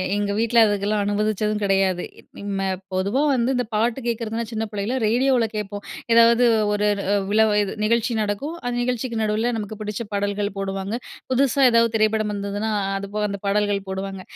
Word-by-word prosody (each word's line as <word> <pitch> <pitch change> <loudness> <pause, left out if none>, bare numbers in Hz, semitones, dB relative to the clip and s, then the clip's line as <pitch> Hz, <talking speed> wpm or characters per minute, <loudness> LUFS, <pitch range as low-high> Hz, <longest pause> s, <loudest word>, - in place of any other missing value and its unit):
எங்க 205 0 -1
வீட்ல 230 0 +4
அதுக்கெல்லாம் 205 0 0
அனுமதிச்சதும் 210 0 0
கெடையாது. 195 -2 +1 0.4
ம் 200 0 -5
ம 195 - 0 0.3
பொதுவா 200 +9 0
வந்து 255 +1 +1
இந்த 250 -1 0
பாட்டு 230 +4 +1
கேக்கிறதுன்னா, 230 0 -2
சின்ன 225 0 -2
பிள்ளைல 210 +5 -2
ரேடியோவில 245 0 +2
கேட்போம். 205 -1 -4 0.3
எதாவது 235 +1 +6 0.3
ஒரு 210 0 +1
ர - - -3
அ - - +3
விழாவ 220 0 +4
இது 195 - -4
நிகழ்ச்சி 235 +1 +1
நடக்கும். 210 +11 -3
அந்த 245 0 -2
நிகழ்ச்சிக்கு 245 -2 -2
நடுவில 215 +3 0
நமக்கு 210 0 -5
பிடிச்ச 210 +1 -4
பாடல்கள் 205 0 -1
போடுவாங்க. 195 +2 -3 0.4
புதுசா 275 +1 +2
ஏதாவது 230 0 +3
திரைப்படம் 215 -1 +1
வந்ததுன்னா, 205 +2 -3
அ - - -2
அது 200 0 -5
போக 210 - 0
அந்த 200 0 -5
பாடல்கள் 200 -1 0
போடுவாங்க. 190 0 -4
210 Hz, 170 wpm, -22 LUFS, 200-230 Hz, 0.4 s, எதாவது